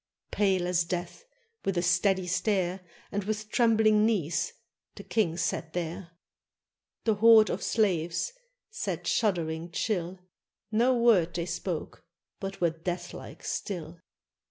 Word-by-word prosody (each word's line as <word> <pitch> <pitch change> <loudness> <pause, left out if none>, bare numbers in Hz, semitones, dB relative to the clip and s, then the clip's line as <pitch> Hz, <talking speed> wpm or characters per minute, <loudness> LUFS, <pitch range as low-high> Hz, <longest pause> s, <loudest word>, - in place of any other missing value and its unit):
Pale 190 -3 +2
as 180 -1 +2
death, 175 - -5 0.4
with 195 -2 -1
a 175 - +1
steady 190 +1 +2
stare. 185 0 0 0.3
And 205 0 -2
with 215 0 -3
trembling 220 -3 +4
knees, 215 - +1 0.4
the - - -9
king 175 -7 0
sat 160 -2 -2
there; 175 +1 -4 0.9
The 220 - +3
horde 220 +1 +6
of - - -3
slaves 180 - 0 0.4
sat 175 - -4
shuddering 170 -6 0
chill; 180 0 -2 0.5
No 240 +4 +3
word 205 -8 +4
they 170 -1 -1
spoke, - - -4 0.4
but 195 -1 -5
were 170 -2 +2
deathlike 175 +2 -6
still. 170 -4 -4
185 Hz, 125 wpm, -28 LUFS, 175-215 Hz, 0.9 s, horde